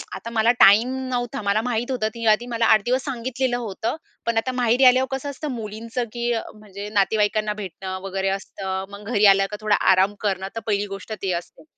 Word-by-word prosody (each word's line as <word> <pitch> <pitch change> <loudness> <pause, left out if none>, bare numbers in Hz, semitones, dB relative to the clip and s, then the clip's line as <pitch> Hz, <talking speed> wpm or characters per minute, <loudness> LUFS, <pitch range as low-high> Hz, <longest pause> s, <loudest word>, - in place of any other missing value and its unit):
आता 225 +5 -7
मला 230 +1 +3
टाईम 210 +6 +7 0.2
नव्हता 245 -3 -2
मला 205 +2 +1
माहित 245 +1 -2
होतं 230 -1 -2
आधी 235 +3 +1
मला 230 -1 0
8 215 -1 +5
दिवस 255 +2 +1
सांगितलेलं 255 -1 -2
होतं. 225 +2 -3 0.3
पण 235 -1 0
आता 255 +3 0
माहेरी 250 +1 +2
आल्यावर 255 +1 +5
कसं 285 +2 -5
असतं 290 +2 -6
मुलींचं 230 +1 -4
की 240 0 -1
अ, 225 - -1 0.2
म्हणजे 205 -1 -8
नातेवाईकांना 210 +1 +1
भेटणं 190 -2 -6
वगैरे 195 0 -2
असतं 190 -1 -4
मग 200 +1 -10
घरी 210 -3 +3
आल्यावर 195 +1 +4
थोडा 215 -1 +3 0.2
आराम 190 +2 +3
करणं 190 -2 -1
तर - - -2
पहिली 205 -1 +1
गोष्ट 195 +2 -7
ती 190 -2 -1
असते. 170 - -7
215 Hz, 195 wpm, -23 LUFS, 200-240 Hz, 0.3 s, टाईम